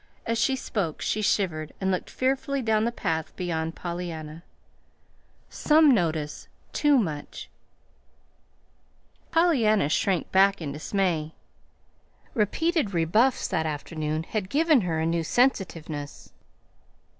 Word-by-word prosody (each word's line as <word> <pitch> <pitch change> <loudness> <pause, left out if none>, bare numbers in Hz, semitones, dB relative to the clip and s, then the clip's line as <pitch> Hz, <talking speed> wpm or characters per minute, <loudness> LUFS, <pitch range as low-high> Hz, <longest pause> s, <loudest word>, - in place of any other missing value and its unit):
As 230 0 -1
she 265 +3 +2
spoke 195 - -3
she 215 - -1
shivered 165 -7 0
and 190 0 0
looked 185 - -2
fearfully 270 +1 -1
down 220 -1 +2
the 235 - 0
path 160 -8 -3
beyond 165 -3 -3
Pollyanna. 170 -3 -6 1.1
"Some 305 -2 +4
notice 160 -7 -1 0.3
too 295 -2 +4
much." 155 - -4 1.8
Pollyanna 235 - +3
shrank 185 +2 0
back 195 +1 +4
in 155 -4 -4
dismay. 160 0 -1 1.0
Repeated 265 - 0
rebuffs 215 +11 +2
that 160 0 0
afternoon 155 +1 -3
had 190 +1 -4
given 305 0 +4
her 170 -4 -1
a 160 - 0
new 165 0 0
sensitiveness. 165 - -1
185 Hz, 110 wpm, -26 LUFS, 160-235 Hz, 1.8 s, Some